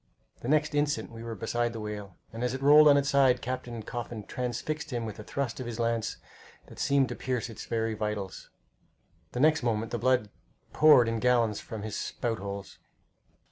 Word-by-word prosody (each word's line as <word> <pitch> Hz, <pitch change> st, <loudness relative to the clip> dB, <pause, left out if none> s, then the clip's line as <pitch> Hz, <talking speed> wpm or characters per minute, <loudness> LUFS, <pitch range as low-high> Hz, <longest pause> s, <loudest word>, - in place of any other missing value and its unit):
The -, -, -7 dB
next 155 Hz, +2 st, +2 dB
instant 145 Hz, -3 st, 0 dB
we 115 Hz, 0 st, -9 dB
were 115 Hz, -1 st, -5 dB
beside 120 Hz, +3 st, -1 dB
the 115 Hz, -, -5 dB
whale, 105 Hz, -4 st, -6 dB, 0.2 s
and 115 Hz, +2 st, -4 dB
as 125 Hz, +1 st, 0 dB
it 135 Hz, -, -6 dB
rolled 150 Hz, +2 st, +8 dB
on 145 Hz, -1 st, +7 dB
its 140 Hz, 0 st, +1 dB
side 135 Hz, -3 st, +4 dB
Captain 120 Hz, -2 st, -5 dB
Coffin 120 Hz, -1 st, -5 dB
transfixed 125 Hz, +8 st, -4 dB
him 120 Hz, -4 st, -3 dB
with 110 Hz, -1 st, -7 dB
a -, -, -7 dB
thrust 135 Hz, +1 st, -3 dB
of 130 Hz, -, -5 dB
his 120 Hz, -1 st, -5 dB
lance 115 Hz, -1 st, -1 dB, 0.5 s
that -, -, -13 dB
seemed 140 Hz, -2 st, +3 dB
to -, -, -4 dB
pierce 125 Hz, -2 st, -2 dB
his 115 Hz, -3 st, -8 dB
very 115 Hz, -1 st, -1 dB
vitals. 105 Hz, -3 st, -4 dB, 0.8 s
The 125 Hz, -, -3 dB
next 155 Hz, +3 st, +4 dB
moment 115 Hz, -2 st, -1 dB
the 120 Hz, -, -2 dB
blood 125 Hz, -5 st, +2 dB, 0.4 s
poured 150 Hz, -6 st, +7 dB
in 115 Hz, 0 st, -1 dB
gallons 120 Hz, -3 st, +2 dB
from 110 Hz, -2 st, -7 dB
his 110 Hz, -1 st, -4 dB
spout 115 Hz, -2 st, -3 dB
holes. 100 Hz, 0 st, -7 dB
120 Hz, 195 wpm, -29 LUFS, 110-130 Hz, 0.8 s, rolled